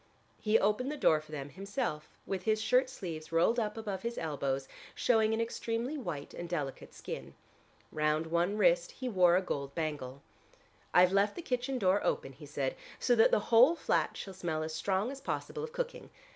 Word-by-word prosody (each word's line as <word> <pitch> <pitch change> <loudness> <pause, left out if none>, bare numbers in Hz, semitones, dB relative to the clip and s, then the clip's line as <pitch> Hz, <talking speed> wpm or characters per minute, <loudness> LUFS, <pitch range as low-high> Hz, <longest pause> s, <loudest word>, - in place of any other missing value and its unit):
He 215 +1 +3
opened 215 +7 +1
the 300 - -4
door 155 - +4
for 155 - -16
them 145 -2 -5
himself 195 - -4 0.2
with 190 -2 -3
his 215 +3 +1
shirt 250 +3 +3
sleeves 165 - -7
rolled 175 +9 +3
up 215 -1 -2
above 205 -4 -4
his 235 0 -4
elbows, 140 -4 -2 0.3
showing 220 -3 +3
an 225 - 0
extremely 230 +3 -2
white 175 - -5
and 175 0 -6
delicate 145 -6 -4
skin. 65 +1 -7 0.6
Round 155 +1 +1
one 170 +5 0
wrist 175 -3 +3
he 255 - -5
wore 180 -6 +5
a 190 - 0
gold 140 -5 -4
bangle. 145 -4 -4 0.7
"I've 180 +1 +5
left 200 +1 +3
the 345 - -6
kitchen 255 0 -1
door 195 -2 +2
open," 135 - -1
he 145 +3 -12
said, 140 -2 -2 0.2
"so 245 - +2
that 225 -2 +6
the 210 - 0
whole 255 +9 +8
flat - - 0
shall 195 - -6
smell 165 -4 -2
as 155 0 -4
strong 195 +7 0
as 275 0 -8
possible 450 - -4
of 470 - -5
cooking. - - -4
190 Hz, 190 wpm, -32 LUFS, 155-230 Hz, 0.7 s, whole